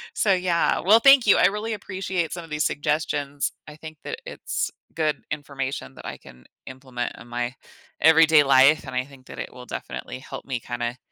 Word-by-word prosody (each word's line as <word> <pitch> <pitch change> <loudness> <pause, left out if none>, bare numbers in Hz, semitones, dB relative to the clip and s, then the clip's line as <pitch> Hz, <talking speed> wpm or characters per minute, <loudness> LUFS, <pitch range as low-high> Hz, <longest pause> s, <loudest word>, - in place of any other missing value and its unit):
So, 200 -3 +3
yeah. 180 -2 +1
Well, 215 +5 +6
thank 275 -3 +7
you. - - +7
I - - +5
really 210 +3 -3
appreciate 190 -4 -3
some 175 -1 -6
of 165 - -13
these 150 0 -1
suggestions. 145 -1 -1 0.2
I 150 - -10
think 155 0 -10
that - - -5
it's - - -3 0.2
good 155 -2 0
information 140 -2 -5
that - - -12
I - - -6
can 60 0 -17 0.2
implement 130 -2 -5
in 115 - -13
my 120 +1 -3 0.5
everyday 160 -1 +7
life, 135 +3 +5
and 130 -1 -7
I 130 0 0
think 135 -2 -17
that - - -10
it - - -6
will 125 0 -11
definitely 130 - -6
help - - -9
me 130 -3 -3
kinda 120 +1 -4
150 Hz, 195 wpm, -24 LUFS, 130-170 Hz, 0.5 s, thank